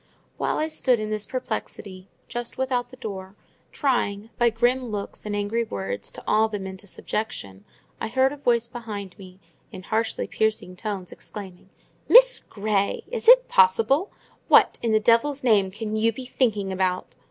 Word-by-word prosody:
While - - -1
I 310 - 0
stood 260 -6 +2
in 215 0 -4
this 215 -1 -2
perplexity, 195 -6 -5 0.2
just 240 0 -5
without 260 -2 -1
the - - -12
door, 195 -5 -7 0.4
trying, 225 -6 -1
by 240 0 +5
grim 245 +3 +1
looks 210 -1 -6
and 205 - -2
angry 205 +3 -1
words, 100 - -5
to - - -10
awe 220 +1 +3
them 205 -3 -5
into 190 +1 -9
subjection, 100 - -5 0.3
I - - -3
heard 260 +4 +2
a - - -9
voice 240 -4 +1
behind 215 -5 -7
me, 185 -1 -12 0.3
in 185 - -9
harshly 220 +3 -1
piercing 215 -4 -1
tones, 195 -3 -5
exclaiming,— 190 -3 -10 0.4
"Miss - - +8
Grey! 200 -1 -2
Is 470 -2 -4
it - - +8
possible? 225 - +3 0.4
What, - - +5
in 230 - 0
the 215 - +4
devil's 240 +6 +2
name, 210 -6 +3
can 215 +2 -5
you 225 +1 +2
be 255 +3 -8
thinking 210 -7 0
about?" 185 -1 -1
220 Hz, 165 wpm, -24 LUFS, 195-245 Hz, 0.4 s, Miss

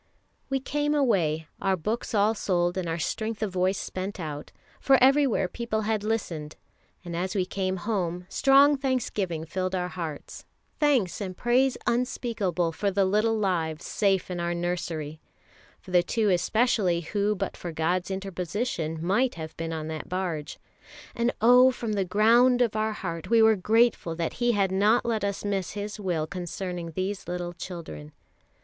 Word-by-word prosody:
We 270 0 0
came 295 +2 -1
away, 165 - +1
our 195 -1 +1
books 220 +7 -3
all 210 +2 +4
sold 175 -4 0
and 185 -3 -2
our 165 - -1
strength 220 +6 -3
of 210 - -2
voice 185 +1 +1
spent 190 +2 -5
out, 150 -3 -6 0.3
for 270 -1 +5
everywhere 270 -6 +4
people 230 +1 -3
had 215 -1 -1
listened; 170 -9 -3 0.5
and 170 -1 -5
as 185 +3 -2
we 185 -2 +1
came 185 0 -2
home, 180 -3 -2
strong 275 +5 +5
thanksgiving 210 - -1
filled 185 +3 -2
our 180 -1 -2
hearts, 165 -5 -6 0.4
thanks 260 - +2
and 185 -2 -5
praise 250 +2 +2
unspeakable 225 -8 0
for 200 +5 -1
the 195 0 +2
little 215 +4 +2
lives 170 -6 -1
safe 195 -3 +1
in 175 - -3
our 170 0 -1
nursery, 170 -3 -3 0.6
for 185 - -13
the 180 -1 +5
two 215 +3 0
especially 185 -1 +2
who 205 +5 0
but - - -3
for 175 - -6
God's 175 +4 -1
interposition 185 -3 -3
might 240 +8 +2
have 160 -1 -7
been 165 0 -4
on 155 -1 -4
that 155 -1 -6
barge 175 -5 -3 0.6
and 235 +1 +1
oh, 250 +3 +7
from 235 -4 -3
the 200 -2 +1
ground 235 +6 +4
of 225 -3 -1
our 215 0 0
heart 170 -5 -5
we 230 0 +5
were 220 0 +6
grateful 215 -3 +2
that 165 0 -2
He 240 0 +3
had 195 -3 +1
not 210 +5 +3
let 225 -3 -1
us 200 0 -2
miss 195 -3 -2
His 205 +1 -5
will 175 -6 -1
concerning 175 -1 -5
these 190 +3 -3
little 175 0 -4
children. 165 - -8
190 Hz, 170 wpm, -27 LUFS, 175-225 Hz, 0.6 s, oh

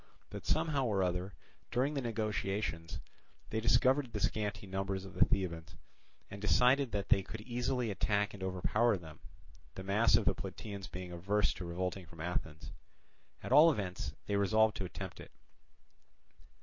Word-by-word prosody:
But - - -7
somehow 140 -5 +1
or 100 -4 +1
other, 90 +2 -2 0.3
during 130 +5 +1
the 140 - -1
negotiations, 105 -7 -2 0.5
they 110 - 0
discovered 130 +3 +3
the 105 - -3
scanty 105 0 -1
numbers 95 0 -3
of 95 - -10
the 90 0 +5
Thebans, 85 -4 -2 0.6
and 100 - -7
decided 125 - +4
that 100 -1 -2
they 95 - +5
could 105 +3 -8
easily 120 0 -1
attack 105 +1 0
and 100 - -10
overpower 100 +4 +1
them; 80 -3 -12 0.6
the 95 - -6
mass 105 +4 +3
of 110 - +3
the - - +4
Plataeans 95 +1 -7
being 90 -1 -7
averse 100 +5 +1
to 90 - -7
revolting 90 +1 -3
from 80 0 -15
Athens. 80 -2 -4 0.7
At - - -5
all 160 +3 +8
events 90 - -4
they 100 - 0
resolved 110 +2 +3
to 95 - -3
attempt 90 0 -7
it. - - -10
100 Hz, 160 wpm, -34 LUFS, 90-110 Hz, 0.7 s, all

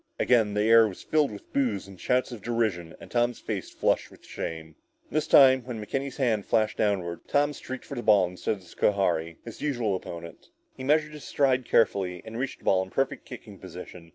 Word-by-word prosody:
Again 110 -4 +3
the 105 - +2
air 115 0 +6
was 95 - -9
filled 155 -2 +2
with 100 -1 -12
boos 115 -9 0
and 95 -2 -13
shouts 125 0 +1
of 120 -4 -8
derision 105 -8 -1
and - - -13
Tom's 120 0 +1
face 100 -5 -4
flushed - - 0
with - - -18
shame. 80 -1 -6 0.4
This 155 +3 0
time, 130 -3 +7
when 120 -2 -6
McKenny's 135 +5 -4
hand 115 -7 0
flashed 110 -1 +1
downward, 90 -5 -1
Tom 145 +1 +2
streaked 130 -1 -8
for - - -8
the 120 - -3
ball, 105 -5 +5
instead 90 +4 -3
of 95 - -15
Schohari, 85 -3 0
his 115 - -9
usual 120 -9 0
opponent. 85 -2 -8 0.3
He 130 - -8
measured 150 +2 +2
his 150 -5 -10
stride 130 -3 +1
carefully 95 -6 +1
and 115 +1 -6
reached 135 +1 -3
the - - -23
ball 95 -1 +4
in 95 - -6
perfect 135 +6 -1
kicking - - -10
position. 85 -2 -10
110 Hz, 205 wpm, -27 LUFS, 95-130 Hz, 0.4 s, time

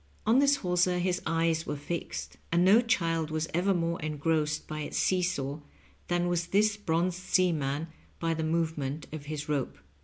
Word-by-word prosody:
On 225 +4 +5
this 280 0 +5
hawser 180 0 +2
his 180 0 0
eyes 165 0 +1
were - - -2
fixed, 85 - -5
and 170 +1 +4
no 210 +5 +7
child 165 -9 0
was 155 0 -1
ever 180 +4 +2
more 170 -2 0
engrossed 155 0 0
by 155 0 -5
its 150 - -4
see 185 -1 +2
saw 145 -4 -2 0.5
than 175 0 +1
was 175 -1 0
this 210 +3 +3
bronzed 175 -2 0
seaman 160 -5 +1 0.3
by 165 -1 0
the 160 0 -2
move 160 0 0
ment 140 +3 -3
of 150 -2 -6
his 150 0 -5
rope. 145 -4 -1
165 Hz, 180 wpm, -29 LUFS, 155-180 Hz, 0.5 s, no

